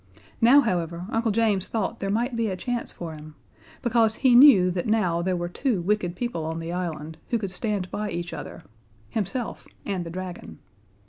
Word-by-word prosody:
Now, 255 +5 +7
however, 175 - -2
Uncle 225 0 +1
James 210 -3 +1
thought 220 -4 -2
there 195 - -2
might 235 +5 0
be 230 -1 0
a 190 -2 -3
chance 240 +5 -3
for 165 -2 -7
him 155 0 -11 0.5
because 230 -2 +3
he 260 -2 +3
knew 240 -9 +8
that 175 +2 -2
now 185 -6 +2
there 185 +1 0
were 175 0 -2
two 225 +4 -1
wicked 180 -1 0
people 240 -7 -3
on 160 +1 -3
the 165 +1 -5
island 160 -3 -4
who 235 - +2
could 200 -4 -4
stand 195 -1 -2
by 210 0 -3
each 170 -1 -4
other - - -8 0.5
himself 220 +3 -3 0.2
and 190 -3 -2
the 170 - -7
dragon. 180 - -7
190 Hz, 190 wpm, -25 LUFS, 175-225 Hz, 0.5 s, knew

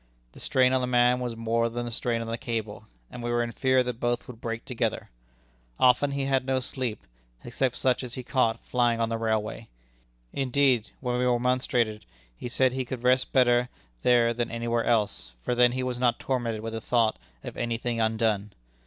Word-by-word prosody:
The - - -15
strain 130 0 +3
on 130 - +2
the 125 - -1
man 125 0 +3
was 120 -2 -3
more 115 +1 0
than 120 +1 -4
the 120 - -5
strain 115 0 -1
on 115 - -5
the 115 - -2
cable, 115 -4 -4 0.3
and 125 - -8
we 120 - -3
were 120 0 +1
in 120 - -4
fear 130 +1 +2
that 125 -2 -4
both 120 0 -1
would 120 -3 -11
break 115 -1 -4
together. 125 - -2 0.7
Often 140 +3 +4
he 140 -1 -1
had 135 -1 +1
no 130 0 0
sleep, 125 -3 -4 0.4
except 125 +1 -1
such 130 0 +1
as 125 -2 -6
he 130 - -5
caught 120 -2 0
flying 120 -2 +1
on 115 -1 +1
the 115 0 -2
railway. 110 0 -2 0.7
Indeed, 130 -3 +2
when 125 -1 -1
we 125 - +1
remonstrated, 120 -3 0 0.3
he 90 - -6
said 130 +1 +2
he 130 0 -1
could 125 -1 -6
rest 130 +1 +3
better 125 -1 +3 0.3
there 120 -1 +4
than 120 0 -2
anywhere 115 0 -1
else, 105 - 0
for - - 0
then 120 0 +4
he 130 0 -2
was 125 -1 -3
not 125 -1 +2
tormented 120 -4 -2
with 115 0 -4
the 115 - -4
thought 115 -2 +1 0.2
of - - -7
any 120 -1 -2
thing 120 -1 -2
undone. 110 -2 0
120 Hz, 205 wpm, -27 LUFS, 115-125 Hz, 0.7 s, Often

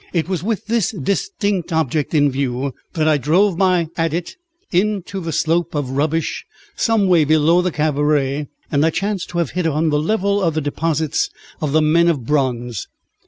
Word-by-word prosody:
It 170 -2 0
was 185 -3 -2
with 215 +2 -2
this 220 -3 +1
distinct 200 - -2
object 155 -1 0
in 145 -2 +4
view 130 0 -2 0.2
that 155 -3 +1
I 155 -2 +3
drove 180 +8 +3
my 180 -2 +2
adit 165 - -2 0.4
into 195 0 0
the 165 -2 -4
slope 165 +2 0
of 140 -3 -2
rubbish 155 +4 -1 0.3
some 225 -4 +2
way 175 -4 +5
below 155 +3 +4
the 180 - 0
cabaret, 145 -2 0 0.2
and 145 0 +2
I 160 - +4
chanced 195 +3 -2
to 175 - -5
have 170 -5 0
hit 180 -2 -1
on 160 +1 +1
the 150 0 +2
level 200 +3 +1
of 165 -4 +1
the 155 - 0
deposits 155 +1 -1 0.3
of 150 -3 -1
the 155 +1 +3
men 165 +3 +4
of 145 -8 0
bronze. 125 -5 -1
160 Hz, 180 wpm, -19 LUFS, 145-180 Hz, 0.4 s, way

